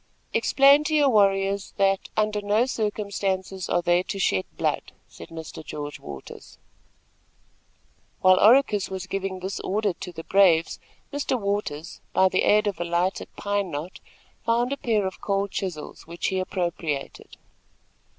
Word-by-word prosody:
"Explain 280 +2 +5
to 310 - 0
your 290 -2 +5
warriors 195 -2 +2
that, 195 -1 +1
under 210 -1 +1
no 210 +4 +2
circumstances, 200 -5 -2
are 175 - +1
they 175 +1 +3
to 190 - -5
shed 95 - +1
blood," - - -1
said - - -12
Mr. 160 -1 -8
George 145 -1 -6
Waters. 70 -2 -10 1.6
While 185 0 +6
Oracus 220 -4 +5
was 190 -1 -5
giving 190 -1 -4
this 190 +2 -4
order 205 0 0
to 180 - -8
his 165 -1 -9
braves, 175 -5 +3 0.3
Mr. 285 -3 -1
Waters, 200 -6 -3
by 190 0 +4
the - - +1
aid 210 +1 +4
of 200 -4 -2
a - - 0
lighted 175 +2 -1
pine 205 -2 -1
knot, 160 +4 -6 0.4
found 240 +3 +1
a - - -4
pair 220 -6 0
of 190 - -5
cold 200 -1 -1
chisels, 175 -6 -5
which 170 +1 -2
he 190 - -1
appropriated. 170 -6 -4
195 Hz, 150 wpm, -25 LUFS, 175-210 Hz, 1.6 s, While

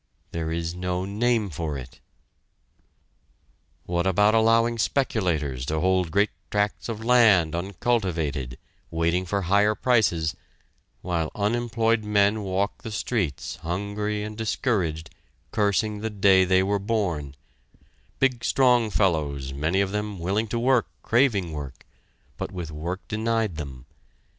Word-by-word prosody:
There 80 -1 -3
is 85 0 -2
no 90 +1 -2
name 110 0 0
for 75 -2 -3
it! 65 0 -10 1.9
What 85 +1 0
about 105 +3 +4
allowing 115 +1 +3
speculators 85 - 0
to 80 0 0
hold 95 0 +2
great 100 +5 +2 0.2
tracts 105 +2 -1
of 110 0 -5
land 110 -10 +5
uncultivated, 85 - -1 0.3
waiting 85 +2 0
for 100 +1 -1
higher 100 +4 +3
prices, 95 -12 +2 0.7
while 85 -3 -1
unemployed 115 +1 +1
men 105 0 +2
walk 100 +1 -2
the - - -6
streets, 105 - -2
hungry 100 +5 -3
and 105 0 -6
discouraged, 95 - -1 0.4
cursing 105 0 +1
the 110 +1 -3
day 95 -2 +4
they 95 0 +3
were 100 +1 0
born: 90 -10 -2 0.8
big 125 -3 +1
strong 125 -4 +3
fellows 75 -9 0
many 80 +8 +1
of 95 -1 -1
them, 105 -1 -3
willing 100 +6 -1
to 120 - -2
work, 125 0 +2 0.2
craving 110 -8 +2
work, 70 -3 -7 0.5
but - - -4
with 85 -4 -6
work 85 +5 -5
denied 110 -4 -1
them. 65 -5 -7
100 Hz, 130 wpm, -25 LUFS, 85-110 Hz, 1.9 s, land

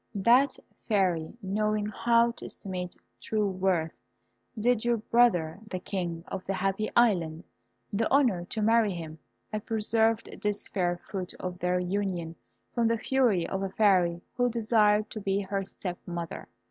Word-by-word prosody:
"That 245 +7 +4 0.3
Fairy, 185 -4 +1
knowing 210 +2 0
how 235 +3 +3
to - - -10
estimate 180 -2 -6 0.3
true 215 -2 0
worth, 185 -4 0 0.7
did 235 0 +2
your 240 0 +2
brother, 210 -8 +2
the 185 - -3
King 175 -3 -4
of 190 - -5
the 195 - -1
Happy 195 +3 -1
Island, 175 -9 +3 0.5
the 220 +2 +1
honour 240 -11 +3
to 215 +3 -3
marry 225 -2 +4
him. 160 -2 -7 0.3
I 215 - 0
preserved 225 +1 0
this 210 0 -2
fair 175 -3 0
fruit 185 0 -6
of 180 -1 -5
their 180 +1 +1
union 180 -3 -2 0.4
from 235 -2 +2
the 230 0 +2
fury 230 -8 +2
of 190 - -3
a 195 - -1
Fairy 180 -4 +3
who 245 0 +2
desired 215 -2 +2
to 215 - -5
be 195 0 0
her 195 0 -2
step 180 -2 -6
mother. 170 -1 -5
200 Hz, 155 wpm, -28 LUFS, 180-225 Hz, 0.7 s, That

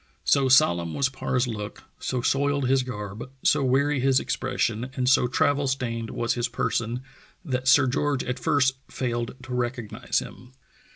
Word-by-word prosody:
So 135 -2 +3
solemn 85 -10 +4
was 140 -1 +2
Parr's 130 -1 -1
look, 105 -3 -6 0.2
so 125 -2 -2
soiled 140 0 +1
his 135 +1 +3
garb, 110 -1 -6
so 150 -2 +3
weary 140 +2 +2
his 130 0 +3
expression, 125 -2 -2
and 125 -1 -1
so 125 -1 +4
travel 145 +3 +1
stained 115 -4 -2
was 120 - -1
his 120 -1 -1
person 115 +2 -2 0.4
that 130 -3 -2
Sir 135 +1 +6
George 135 +1 0
at 125 +1 -3
first 135 -3 +2
failed 120 -1 -3
to 130 -1 -7
recognize 120 -2 -2
him. 125 +1 -5
130 Hz, 160 wpm, -25 LUFS, 120-135 Hz, 0.4 s, Sir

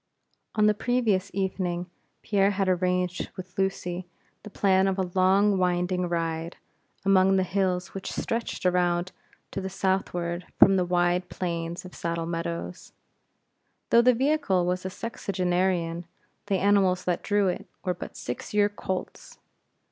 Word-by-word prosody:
On 215 -1 +4
the 210 - +5
previous 215 -4 +1
evening, 185 -2 -2 0.4
Pierre 200 -2 +3
had 195 -1 0
arranged 180 0 0
with 185 -1 -9
Lucy 180 -2 -2 0.3
the 210 - -10
plan 190 -1 +3
of 190 0 0
a 185 -2 -2
long 195 +2 +4
winding 180 0 +1
ride, 165 0 -2 0.5
among 195 0 +5
the 190 - +3
hills 185 -1 -1
which 195 - -5
stretched 230 -4 -3
around 180 0 +2 0.4
to 195 - -3
the 190 - -4
southward 180 -3 -1
from 195 - +7
the 185 -1 +2
wide 175 0 +1
plains 170 0 -4
of 180 - -10
Saddle 170 0 -3
Meadows. 90 - -5 1.0
Though 235 - +7
the 250 0 +5
vehicle 265 - +2
was 180 +1 -1
a - - -4
sexagenarian, 180 -5 -1 0.4
the 195 -2 +2
animals 190 -2 +3
that 180 -1 0
drew 205 -2 +2
it, 180 - -3 0.2
were 180 - +1
but 175 - -9
six 125 - -6
year 205 0 +4
colts. 190 -2 -6
185 Hz, 145 wpm, -27 LUFS, 175-195 Hz, 1.0 s, from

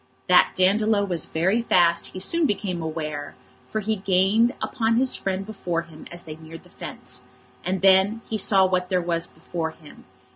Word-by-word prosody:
That - - +5
Dandolo 200 +2 +2
was 175 -5 -1
very 190 +8 +1
fast 170 -6 +3
he 185 - -8
soon 320 - +2
became 185 -5 -2
aware, 155 -2 -5 0.3
for 215 - -3
he 215 +1 -1
gained 195 +5 +2
upon 225 -1 0
his 255 +2 +4
friend 195 0 -3
before 175 -5 -3
him 160 -2 -13
as 175 0 -6
they 155 -1 -9
neared 160 0 -12
the - - -20
fence. - - -6 0.4
And 185 +1 -2
then 195 +3 +5
he 220 - -3
saw 190 -1 +5
what 180 -1 0
there 185 - +2
was 170 -1 -2
before 165 -2 -5
him. 155 -2 -16
185 Hz, 180 wpm, -24 LUFS, 170-210 Hz, 0.4 s, That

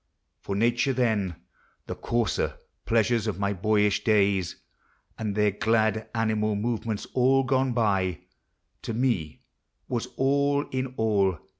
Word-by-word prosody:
For 100 - -4
nature 120 +5 +2
then 110 -8 0 0.5
(The - - -4
coarser 120 -4 -1 0.3
pleasures 115 0 +2
of 105 - -1
H1J 100 -2 -2
boyish 105 -1 +2
days 100 -4 +2 0.6
And 105 -3 -2
their 105 -1 +3
glad 110 +1 +1
animal 110 -1 +1
movements 110 0 -2
all 135 +1 +3
gone 130 0 +1
by) 95 -7 0 0.6
Tome 115 -10 -1 0.5
was 120 -1 -2
all 140 +1 +2
in 130 0 -3
all. 100 -5 +2
110 Hz, 120 wpm, -26 LUFS, 100-120 Hz, 0.6 s, their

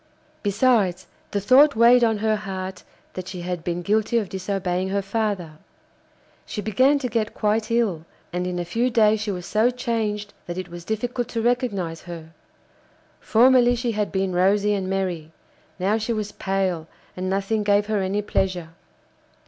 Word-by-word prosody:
Besides, 205 -3 +2 0.2
the 200 - -1
thought 265 +8 +6
weighed 240 +2 +6
on 225 -2 +3
her 215 +1 +1
heart 190 -3 -5 0.3
that 185 -1 -6
she 185 -2 -6
had 175 -1 -4
been 175 0 -3
guilty 220 +4 +1
of 210 -5 -1
disobeying 190 -1 -2
her 200 0 -1
father. 195 -6 -2 0.8
She - - -6
began 255 +8 +3
to 270 -3 -2
get 225 -2 -2
quite 215 0 0
ill, 215 -9 0 0.3
and 180 0 -1
in 180 -1 -3
a 175 - -2
few 230 +8 0
days 220 -2 +4
she 215 - -3
was 180 -3 -4
so 220 +5 +2
changed 220 -4 -2
that 175 0 -5
it 185 -1 -5
was 175 0 -9
difficult 240 +3 -2
to 230 - -3
recognise 205 -9 -1
her; 165 -2 -9 0.9
formerly 245 +1 +5
she 240 0 -1
had 210 -1 -2
been 190 -1 -1
rosy 200 +3 +3
and 190 -2 -2
merry, 180 -5 -2 0.5
now 200 +4 +1
she 225 +2 -1
was 215 -2 -3
pale 190 -4 -2 0.3
and 185 0 -3
nothing 200 +3 0
gave 205 0 +3
her 210 -2 0
any 195 +2 -1
pleasure. 185 -4 -1
205 Hz, 170 wpm, -23 LUFS, 185-225 Hz, 0.9 s, thought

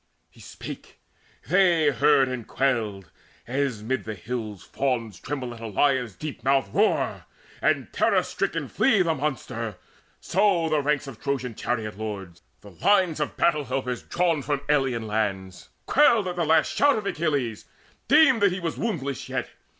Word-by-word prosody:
He - - -21
spake; - - -10 0.5
they 175 -3 +4
heard 140 -3 +4
and 130 -3 -5
quailed: 110 - -1 0.3
as 125 -4 -2
mid 130 +4 -2
the 110 -1 -5
hills 110 0 -5
Fawns 115 -8 -2
tremble 130 -4 -5
at 115 - -11
a 115 - -6
lion's 125 0 +1
deep 155 -2 -7
mouthed 135 0 +1
roar, 210 +2 +1 0.3
And - - 0
terror - - +3
stricken - - -2
flee 220 -8 +3
the 165 -2 +1
monster, 125 -8 -4 0.4
so 185 -4 +2
The 155 -1 +2
ranks 150 0 0
of 135 -6 -10
Trojan 130 -4 -2
chariot 110 -2 -3
lords, 95 -6 -6 0.2
the 100 - -13
lines 185 - +2
Of 150 - -3
battle 150 -4 +2
helpers 125 -1 -3
drawn 170 -4 0
from 145 0 -2
alien 135 -6 +1
lands, 100 -4 -3 0.2
Quailed 235 -9 +4
at 180 - -3
the 175 -2 0
last 160 +1 +3
shout 285 -3 +4
of 215 - -4
Achilles, 145 - -1 0.4
deemed 280 -6 +5
That 200 -2 +5
he 185 - -3
was 170 -2 -4
woundless 145 - -3
yet. - - -3
135 Hz, 160 wpm, -25 LUFS, 115-165 Hz, 0.5 s, deemed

